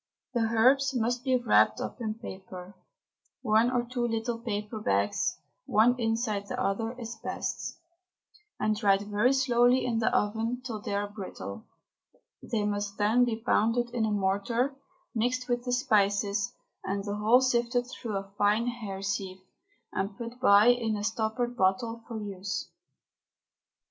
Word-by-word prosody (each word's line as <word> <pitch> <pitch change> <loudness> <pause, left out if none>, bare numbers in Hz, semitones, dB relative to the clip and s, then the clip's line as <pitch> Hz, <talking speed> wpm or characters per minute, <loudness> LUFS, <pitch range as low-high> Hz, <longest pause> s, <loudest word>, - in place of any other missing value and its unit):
The 240 - +1
herbs 265 +4 +4
must 245 +1 0
be 260 -2 +3
wrapped 245 -1 +3
up - - -5
in 215 -2 -2
paper 190 -3 -9 0.7
(one 220 +3 +4
or 245 -1 +1
two 240 0 -2
little 230 +1 -2
paper 215 -1 -4
bags, 100 - 0 0.3
one 230 +4 +4
inside 225 -3 -1
the 250 +2 -4
other, 225 0 -1
is 230 -1 -6
best), - - -4 0.8
and 215 0 +1
dried 200 -2 +3
very 210 +4 +2
slowly 250 -1 +3
in 235 -2 0
the 225 - +2
oven 225 +4 0
till 220 -4 -4
they 200 - -3
are 205 0 -1
brittle. 190 - -8 0.7
They 215 -3 -2
must 205 0 -2
then 220 +4 +4
be 235 -2 -1
pounded 235 0 +2
in 235 -2 0
a 215 - -1
mortar, 205 +6 +1
and 275 - -21 0.4
mixed 250 +2 0
with 245 0 -1
the 250 - -2
spices, 205 -5 +2 0.3
and 195 +1 -2
the 205 0 -3
whole 220 +4 +5
sifted 245 -1 +1
through 230 -4 -5
a 195 0 -7
fine 210 +3 +3
hair 215 -6 -5
sieve 195 -1 -3 0.5
and 195 +1 -2
put 235 +1 -7
by 210 -2 +6
in 230 -3 +2
a 205 - -4
stoppered 225 +3 -1
bottle 225 +3 0
for 230 -2 -5
use. 195 -2 -5
225 Hz, 155 wpm, -29 LUFS, 205-245 Hz, 0.8 s, by